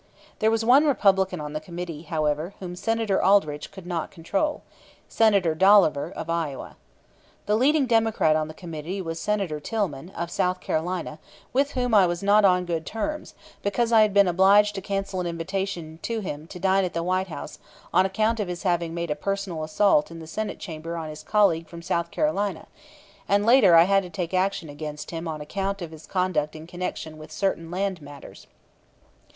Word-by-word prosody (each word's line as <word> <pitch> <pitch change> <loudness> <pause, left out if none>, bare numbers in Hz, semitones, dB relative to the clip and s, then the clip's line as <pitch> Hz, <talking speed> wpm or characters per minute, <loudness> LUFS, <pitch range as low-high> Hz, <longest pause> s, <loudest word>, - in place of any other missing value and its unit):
There 220 - +3
was 225 0 0
one 275 +6 +6
Republican 195 - +2
on 150 0 -6
the 155 - -2
committee, 170 -1 -7
however, 155 +2 -2
whom 180 -2 -6
Senator 225 +1 0
Aldrich 155 -7 +2
could 190 -3 -11
not 175 -3 -3
control 195 - -2 0.4
Senator 200 -7 +3
Dolliver, 180 -4 +4
of 165 - -6
Iowa. 165 -5 -3 0.7
The 210 - +2
leading 280 +5 +3
Democrat 225 -9 +2
on 155 0 0
the 155 - -10
committee 165 +2 -6
was 165 -3 -4
Senator 200 -7 -1
Tillman, 175 -5 -3
of 170 +1 -3
South 180 0 0
Carolina, 160 -1 -3 0.3
with 280 +2 +1
whom 245 -2 -1
I 195 -4 +6
was 175 +2 -3
not 205 +1 +5
on 180 -2 +4
good 165 -2 -2
terms, 300 - -4 0.3
because 230 +3 0
I 225 -1 +6
had 215 -1 +4
been 200 -1 +5
obliged 195 +4 +5
to 195 - -5
cancel 195 -1 -3
an 175 - -3
invitation 170 -1 -4
to 230 -1 -2
him 155 -5 -6
to 180 - -9
dine 190 +1 +2
at 180 -2 -3
the 170 - -1
White 185 +2 0
House 165 - -8 0.3
on 185 - +5
account 215 +4 0
of 205 - -1
his 175 -1 -5
having 170 -3 0
made 170 -2 -3
a - - 0
personal 195 -1 -3
assault 155 0 +3
in 165 - -9
the 165 - -9
Senate 210 +7 -4
Chamber 165 -1 -6
on 160 -1 -5
his 155 0 -8
colleague 165 -2 +2
from 170 0 -10
South 170 -1 -1
Carolina; 205 - -1 0.6
and 205 +1 +3
later 230 -7 +6
I 165 - +9
had 195 +2 +3
to 180 - -9
take 175 -2 -4
action 185 -2 0
against 150 0 -7
him 165 0 -5
on 155 -2 -4
account 195 +6 -3
of 170 -3 -6
his 160 -1 -12
conduct 175 -5 -1
in 155 0 -9
connection 165 -3 -6
with 155 0 -11
certain 165 -1 -2
land 185 -1 -2
matters. 145 -1 -12
180 Hz, 190 wpm, -25 LUFS, 160-200 Hz, 0.7 s, I